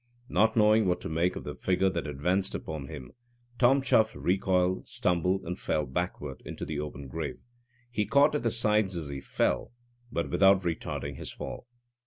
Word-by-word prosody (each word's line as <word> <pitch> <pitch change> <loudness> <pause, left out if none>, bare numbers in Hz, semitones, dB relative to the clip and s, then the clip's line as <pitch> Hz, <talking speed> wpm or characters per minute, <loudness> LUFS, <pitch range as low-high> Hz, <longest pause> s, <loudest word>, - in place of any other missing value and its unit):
Not 110 +2 +3
knowing 110 -1 +5
what 90 0 +1
to - - -5
make 85 +3 +1
of - - -6
the - - -5
figure 95 +1 +1
that 85 -3 -3
advanced 90 +7 0
upon 75 -4 -5
him, 65 -5 -8 0.5
Tom 135 +2 +5
Chuff 110 -4 +3
recoiled, 95 0 +1
stumbled, 90 +2 +1
and 90 0 -5
fell 75 -1 0
backward 65 - -4
into - - -6
the 75 0 -3
open 70 -2 -6
grave. 65 - -4 0.5
He 105 -4 0
caught 140 +6 +5
at 150 - 0
the 115 - +1
sides 105 -4 +1
as 80 -4 -5
he 70 -1 -5
fell, - - 0 0.4
but 85 - -2
without 95 +2 +5
retarding 75 -4 -3
his - - -6
fall. - - -7
90 Hz, 180 wpm, -29 LUFS, 80-105 Hz, 0.5 s, knowing